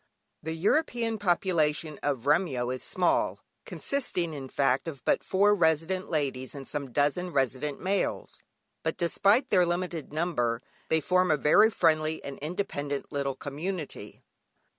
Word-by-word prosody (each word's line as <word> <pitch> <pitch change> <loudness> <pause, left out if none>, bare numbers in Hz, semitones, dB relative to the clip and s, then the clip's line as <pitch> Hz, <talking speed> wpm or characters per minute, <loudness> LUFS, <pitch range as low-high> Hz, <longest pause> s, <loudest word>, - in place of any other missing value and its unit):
The 160 +1 -4
European 230 - 0
population 165 -5 +1
of 140 -4 -2
Remyo 145 -6 +1
is 130 - -5
small, 180 -1 +1 0.3
consisting 180 - -1
in 135 -3 -7
fact 135 +1 +1
of 140 -6 -7
but - - +2
four 205 +2 +3
resident 170 +1 +1
ladies, 140 -4 -2
and 135 -1 -7
some 140 -3 -4
dozen 150 +7 +1
resident 135 0 -1
males; 195 +2 -2 0.4
but - - -2
despite 200 +8 +3
their 185 -3 +5
limited 175 -3 -2
number 135 -8 -1 0.3
they 160 0 +2
form 185 +3 +2
a 155 - +3
very 150 +10 +5
friendly 160 -6 +1
and 140 -1 -7
independent 145 -4 -4
little 140 -2 -2
community. 150 +4 -6
160 Hz, 140 wpm, -28 LUFS, 140-185 Hz, 0.4 s, their